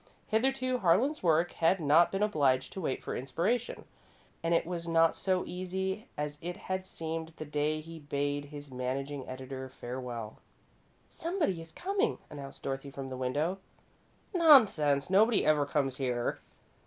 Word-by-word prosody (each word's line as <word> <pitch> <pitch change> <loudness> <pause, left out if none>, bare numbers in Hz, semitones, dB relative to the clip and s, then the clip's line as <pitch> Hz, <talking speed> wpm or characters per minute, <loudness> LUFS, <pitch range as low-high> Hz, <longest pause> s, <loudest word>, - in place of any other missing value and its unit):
Hitherto 255 +2 +1
Harlan's 230 - +3
work 170 0 +3
had 170 +3 +2
not 160 +2 +5
been 195 +1 0
obliged 135 -10 +2
to 190 - -5
wait 135 -6 -2
for - - -4
inspiration, 180 - -1 0.6
and 165 - -1
it 170 - +3
was 170 -1 -4
not 165 0 +4
so 185 -1 0
easy 190 +3 -3
as 150 0 -3
it 175 +1 -4
had 185 0 -4
seemed 160 -1 -5
the 155 - -5
day 150 +1 -1
he 165 +1 -10
bade 145 0 -2
his 145 -1 -10
managing 130 +2 -3
editor 130 0 -6
farewell. 120 -3 -6 0.7
"Somebody 325 - -1
is 165 0 -11
coming," 400 - 0
announced 140 -2 -9
Dorothy, 135 +1 -3
from 135 -1 -6
the 130 - -5
window. 145 +9 -1 0.7
"Nonsense! 205 - +5
Nobody 215 +4 +5
ever 150 -2 +3
comes 135 -3 0
here." 125 -3 -1
160 Hz, 150 wpm, -31 LUFS, 140-190 Hz, 0.7 s, not